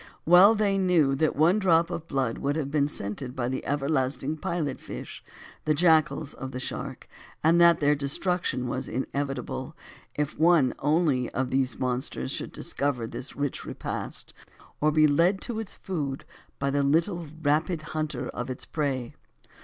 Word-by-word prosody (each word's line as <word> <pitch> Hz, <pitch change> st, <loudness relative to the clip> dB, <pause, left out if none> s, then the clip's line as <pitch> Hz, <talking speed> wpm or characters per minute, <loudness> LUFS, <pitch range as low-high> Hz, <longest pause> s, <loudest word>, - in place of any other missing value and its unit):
Well 185 Hz, +6 st, +8 dB
they 200 Hz, -2 st, +1 dB
knew 170 Hz, -7 st, +3 dB
that 155 Hz, +1 st, +1 dB
one 170 Hz, +8 st, +4 dB
drop 170 Hz, -3 st, +3 dB
of 170 Hz, -1 st, -5 dB
blood 135 Hz, -6 st, -1 dB
would 140 Hz, +1 st, 0 dB
have 145 Hz, -3 st, -2 dB
been 145 Hz, -1 st, +2 dB
scented 125 Hz, 0 st, -4 dB
by 120 Hz, -2 st, -1 dB
the 130 Hz, -, -3 dB
everlasting 140 Hz, 0 st, -1 dB
pilot 165 Hz, -5 st, -2 dB
fish, -, -, -8 dB, 0.4 s
the 155 Hz, -, +2 dB
jackalls 160 Hz, -2 st, +3 dB
of 130 Hz, -, -6 dB
the 125 Hz, -, -4 dB
shark; 130 Hz, +1 st, -6 dB, 0.4 s
and 165 Hz, +2 st, +5 dB
that 170 Hz, -1 st, +6 dB
their 145 Hz, 0 st, +4 dB
destruction 140 Hz, -2 st, -1 dB
was 130 Hz, +1 st, -3 dB
inevitable, 135 Hz, +2 st, -4 dB, 0.4 s
if 150 Hz, 0 st, -2 dB
one 160 Hz, -5 st, +5 dB
only 150 Hz, -4 st, +2 dB
of 130 Hz, 0 st, -1 dB
these 130 Hz, -1 st, 0 dB
monsters 125 Hz, -, -2 dB
should -, -, -4 dB
discover 140 Hz, -5 st, -2 dB
this 125 Hz, +4 st, -6 dB
rich 145 Hz, -2 st, -2 dB
repast, -, -, -5 dB, 0.5 s
or 155 Hz, +1 st, +3 dB
be 155 Hz, 0 st, +5 dB
led 170 Hz, +6 st, +3 dB
to 230 Hz, -2 st, -2 dB
its 220 Hz, -3 st, -6 dB
food 145 Hz, -8 st, -4 dB, 0.3 s
by 140 Hz, 0 st, -1 dB
the 140 Hz, 0 st, +1 dB
little 165 Hz, +4 st, +1 dB
rapid 155 Hz, +2 st, +1 dB
hunter 155 Hz, -1 st, -2 dB
of 120 Hz, +1 st, -5 dB
its 130 Hz, -, -6 dB
prey. 135 Hz, -6 st, -2 dB
145 Hz, 160 wpm, -27 LUFS, 130-165 Hz, 0.5 s, Well